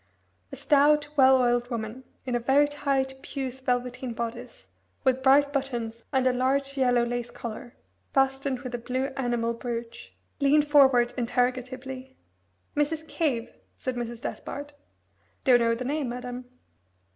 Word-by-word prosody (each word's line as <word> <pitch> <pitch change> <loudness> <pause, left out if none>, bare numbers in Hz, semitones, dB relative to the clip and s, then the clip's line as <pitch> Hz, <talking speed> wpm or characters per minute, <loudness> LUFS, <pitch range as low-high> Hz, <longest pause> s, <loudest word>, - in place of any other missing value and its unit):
A - - -6
stout 295 0 +3
well 265 -2 +6
oiled 245 -1 +2
woman, 230 +1 -5 0.2
in 255 - -3
a 240 - +2
very 270 +5 +4
tight 275 -2 -1
puce 265 -2 -5
velveteen 250 -1 -2
bodice 235 +2 -6 0.3
with 260 -1 +2
bright 285 +2 +5
buttons 235 -5 -3
and 265 -2 +2
a 255 - +4
large 275 +2 0
yellow 245 -3 +3
lace 240 0 -3
collar, 235 0 -8 0.4
fastened 270 -1 +1
with 250 -2 -7
a 240 - -2
blue 255 +3 -2
enamel 240 -3 0
brooch, 235 0 -6 0.2
leaned 295 +1 +4
forward 265 -5 +5
interrogatively. 255 +2 -2 0.6
"Mrs. 310 +2 -1
Cave?" 260 -9 -1 0.2
said 255 - -3
Mrs. 235 -1 -5
Despard. 290 +1 -6 0.7
"Don't 250 -2 +6
know 230 -1 +2
the 250 +2 -5
name, 285 -1 -1
madam." 250 +1 -6
255 Hz, 140 wpm, -27 LUFS, 240-275 Hz, 0.7 s, well